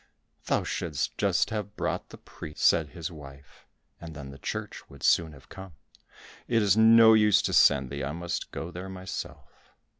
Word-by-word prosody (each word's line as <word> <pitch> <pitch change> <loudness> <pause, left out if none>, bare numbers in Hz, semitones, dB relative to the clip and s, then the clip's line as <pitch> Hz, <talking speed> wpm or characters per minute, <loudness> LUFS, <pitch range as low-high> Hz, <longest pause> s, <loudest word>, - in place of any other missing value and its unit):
"Thou - - 0
shouldst 75 -5 -3
just - - +1
have 105 -2 -5
brought - - -3
the - - -12
priest," 75 - -7
said 80 - +4
his 85 +5 -7
wife, 70 -3 -14 0.3
"and 80 -2 -10
then 70 -2 -9
the 70 - -13
church - - -6
would - - -14
soon 80 -2 +3
have 70 -1 -17
come. 95 -3 -11 0.7
It 115 -2 +2
is 100 -1 +3
no 110 0 +7
use 105 -2 +5
to - - -2
send 65 -2 +4
thee, 70 -1 -4
I 70 - -3
must 85 +2 -5
go 85 +2 -7
there 90 +2 -8
myself." 95 0 -8
85 Hz, 180 wpm, -27 LUFS, 70-100 Hz, 0.7 s, no